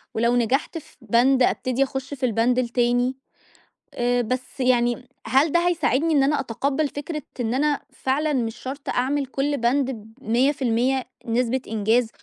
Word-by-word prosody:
ولو 235 +2 +2
نجحت 250 +7 0
في 320 - -12
بَند 245 +4 +3
أبتدي 255 +1 +1
أخش 270 +1 -5
في 265 -2 -2
البَند 240 +2 +2
التاني، 245 +1 +1 0.8
آآ، 245 0 +1
بس 255 +3 -4
يعني 245 -1 +1 0.2
هل 280 +4 +3
ده 345 +2 +2
هيساعدني 320 -2 +1
إن 280 -2 +4
أنا 290 +2 +2
أتقبّل 275 +5 -1
فكرة 300 +2 -5 0.2
إن 235 -1 -1
أنا 290 +2 +1
فعلًا 295 +3 0
مش 230 -4 -1
شرط 270 +4 -7
أعمل 275 +3 0
كلّ 275 +2 -1
بَند 260 +3 +1
ب 220 -2 -10
100% 255 +1 +1 0.2
نسبة 245 +2 0
إنجاز، 220 +2 +1
255 Hz, 150 wpm, -23 LUFS, 240-280 Hz, 0.8 s, إن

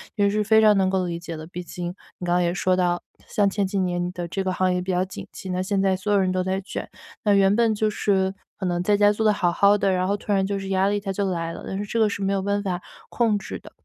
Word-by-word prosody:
也 205 -2 +3
是 210 +1 +1
非 220 +1 +5
常 215 -1 +6
能 190 -1 +2
够 190 -1 0
理 170 -1 -3
解 170 -1 -7
的。 155 - -8
毕 180 +1 -7
竟 175 0 -5 0.3
你 180 - -6
刚 175 - +1
刚 180 - +3
也 175 -1 +1
说 185 0 +1
到， 175 -1 0 0.2
像 205 -1 +2
前 195 0 0
几 195 - -3
年 175 -2 0
你 175 - -2
的 175 -1 -5
这 190 +3 -3
个 185 - -1
行 185 0 +1
业 180 - 0
比 185 - -3
较 185 +1 +1
景 190 - -9
气。 190 - -8
那 180 0 -1
现 195 +1 0
在 190 -1 +2
所 205 +3 -3
有 205 - +4
人 185 -1 +1
都 185 0 0
在 190 +1 -1
卷， 195 - -6 0.3
那 205 -2 +3
原 195 +1 +4
本 230 -2 +3
就 215 +1 +1
是 190 -2 +1 0.2
可 190 - -4
能 175 -1 0
在 205 +2 +3
家 205 0 +5
做 220 +1 -1
得 215 - +6
好 175 -3 +1
好 200 +3 +4
的， 195 -1 +1
然 185 0 +1
后 200 - +1
突 205 - -5
然 195 -1 +2
就 200 0 -2
是 195 - -6
压 190 0 +2
力 205 0 +1
它 195 -1 -4
就 195 0 -1
来 165 -2 -2
了， - - -9
但 190 - -3
是 205 - -3
这 230 +2 -2
个 215 -1 +4
是 200 - -4
没 195 0 0
有 195 - 0
办 200 +1 0
法 180 -3 -2 0.3
控 225 -4 +2
制 195 - -7
的。 - - -14
190 Hz, 340 characters per minute, -24 LUFS, 180-205 Hz, 0.3 s, 常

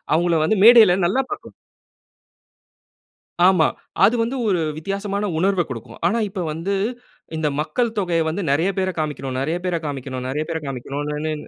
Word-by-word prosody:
அவங்கள 170 -1 +2
வந்து 195 +6 +1
மேடையில 225 -6 +8
நல்லா 210 +9 +1
பார்க்கலாம். 410 - -7 1.9
ஆமா. 180 -5 +4 0.4
அது 225 +5 +5
வந்து 235 +4 -1
ஒரு 180 -4 +1 0.2
வித்தியாசமான 200 +4 -3
உணர்வ 190 0 +2
கொடுக்கும். 115 -4 -8
ஆனா, 230 +6 +1
இப்ப 190 -1 -5
வந்து, 165 +6 -3 0.6
இந்த 155 -1 0
மக்கள் 230 +8 -1
தொகைய 170 -3 0
வந்து 180 +4 -3
நெறைய 160 +7 +2
பேரை 185 -1 -1
காமிக்கணும், 135 -4 -3
நெறைய 160 +5 -1
பேரை 175 -2 0
காமிக்கணும், 130 -2 -5
நெறைய 150 +3 -1
பேரை 160 -1 -3
காமிக்கணுன்னே 145 +4 -4
170 Hz, 145 wpm, -21 LUFS, 150-195 Hz, 1.9 s, மேடையில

